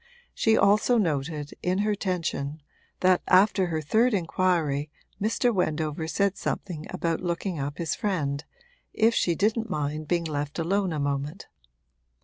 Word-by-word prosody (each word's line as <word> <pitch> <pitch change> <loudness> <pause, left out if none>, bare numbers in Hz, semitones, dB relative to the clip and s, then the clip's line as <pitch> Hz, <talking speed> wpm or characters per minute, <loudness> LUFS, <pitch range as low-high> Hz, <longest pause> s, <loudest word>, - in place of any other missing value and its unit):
She 225 0 +3
also 210 +4 +4
noted, 150 -5 -1
in 180 +1 0
her 215 - +2
tension, 165 -7 -3 0.4
that 185 -1 +4
after 190 0 +4
her 160 -2 -2
third 220 - +3
inquiry 165 -5 0 0.3
Mr. 230 +3 +2
Wendover 160 -3 -1
said 200 +3 0
something 160 -5 -4
about 165 -1 -1
looking 175 -1 -2
up 140 +1 -3
his 170 -2 -1
friend, 150 -9 -1 0.5
if 225 +1 +3
she 175 -6 +1
didn't 220 +4 0
mind 150 -2 -2
being 170 +1 +1
left 145 -2 -3
alone 190 +3 0
a 155 - -2
moment. 140 +4 -3
170 Hz, 140 wpm, -26 LUFS, 150-200 Hz, 0.5 s, also